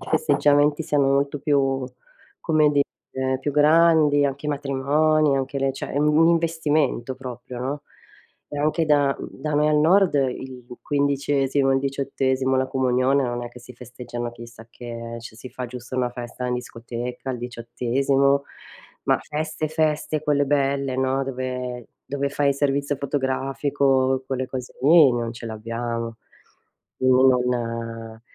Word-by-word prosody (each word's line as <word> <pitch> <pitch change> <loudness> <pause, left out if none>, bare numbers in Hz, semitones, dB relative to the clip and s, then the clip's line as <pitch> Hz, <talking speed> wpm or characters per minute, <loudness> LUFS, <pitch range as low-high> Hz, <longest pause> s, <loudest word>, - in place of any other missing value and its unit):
i - - -10
festeggiamenti 145 - +3
siano 145 -3 +1
molto 140 +1 0
più, 135 -2 +1 0.6
come 155 -2 +3
dire, 130 -2 -2
più 145 - -2
grandi, 150 -1 +5
anche 140 +1 -2
i - - -1
matrimoni, 145 +1 +2
anche 135 +1 -2
le 135 0 0
cioè 135 - -6
è 140 - -1
un 150 0 +3
un 165 +1 +6
investimento 155 -6 +1
proprio, 125 -1 -8
no. 140 +3 -3 0.7
E 145 - -5
anche 155 +2 +1
da, 145 -2 +3
mhmm - - -6
da 150 -1 -1
me 150 +1 +3
al 150 - +3
nord 180 +3 +4
il 130 -2 -2 0.2
quindicesimo, 140 -1 +1
il 135 - +3
diciottesimo, 135 -1 0
la 130 - +1
comunione, 130 +1 +2
non 120 -1 -3
è 120 - -5
che 120 - -13
si 125 +1 -13
festeggiano 120 0 -7
chissà 120 -1 -12
che, 115 -1 -7
eh, 115 - -8
cioè 115 -1 -11
si 125 +3 -10
fa 125 - -5
giusto 125 +1 -8
una 125 -1 0
festa 120 +1 -6
in 125 - -1
discoteca 120 +1 -6
al 125 - -4
diciottesimo, 130 +4 0 0.6
ma - - +3
feste 155 0 -3
feste 155 -1 0
quelle 145 -2 +2
belle, 140 -1 0
no, 130 +1 +1
dove 125 -2 -4 0.2
dove 140 0 -1
fai 140 0 0
il 140 - 0
servizio 140 0 0
fotografico, 135 -1 0
quelle 130 -1 -2
cose 130 -1 -7
lì, 155 0 +7
non 115 -1 -2
ce 115 - -10
l'abbiamo. 115 +1 -4 0.8
Quindi 130 0 +4 0.2
non 115 -2 -4
135 Hz, 155 wpm, -23 LUFS, 125-145 Hz, 0.8 s, lì